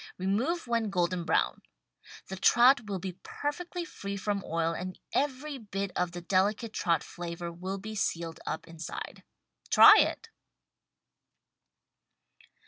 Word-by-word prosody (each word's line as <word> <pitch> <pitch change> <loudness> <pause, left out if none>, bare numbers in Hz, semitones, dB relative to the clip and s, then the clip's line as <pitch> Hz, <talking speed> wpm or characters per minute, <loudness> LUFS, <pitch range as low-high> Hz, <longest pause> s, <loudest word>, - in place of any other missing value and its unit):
Re 185 - -5
move 255 - 0
when 230 -3 0
golden 175 -2 0
brown. 160 - +1 0.7
The 190 - -5
trout 240 +4 +5
will 200 -2 -2
be 185 0 -6
perfectly 345 +4 -4
free 200 - -6
from 200 0 -2
oil 165 0 -1
and 185 +2 -5 0.2
every 280 +1 -1
bit 200 -3 -4
of 180 -1 0
the 175 0 -7
delicate 205 +5 +1
trout 165 -3 +1
flavor 170 0 -6
will 185 +3 -5
be 215 +3 -7
sealed 170 -5 -2
up - - -4
inside. 165 -2 -7 0.5
Try - - +9
it! - - 0
195 Hz, 135 wpm, -29 LUFS, 175-235 Hz, 0.7 s, Try